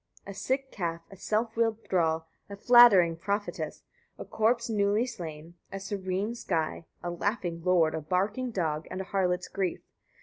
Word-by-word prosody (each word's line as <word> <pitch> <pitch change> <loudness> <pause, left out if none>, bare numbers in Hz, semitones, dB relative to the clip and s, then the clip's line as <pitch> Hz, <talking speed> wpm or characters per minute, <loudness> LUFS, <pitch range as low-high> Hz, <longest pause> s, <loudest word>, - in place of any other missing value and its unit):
A 200 - -7
sick 265 +6 -2
calf, 170 -3 -3
a - - -10
self 220 +4 -1
willed 225 -1 0
thrall, 165 -3 +1 0.2
a 200 - -6
flattering 200 -7 +7
prophetess, 200 +4 -3 0.3
a - - -7
corpse 230 +2 +1
newly 210 +1 +2
slain, 165 -8 -8 0.2
[a 195 - -5
serene 195 +2 -3
sky, 165 -7 -2 0.2
a 175 - -2
laughing 175 -2 -2
lord, 170 -3 +3
a 160 - -3
barking 200 - -1
dog, 160 -7 -2
and 185 - -5
a - - -2
harlot's 180 -2 0
grief]; 190 -3 -2
88. - - -46
195 Hz, 165 wpm, -29 LUFS, 170-220 Hz, 0.3 s, flattering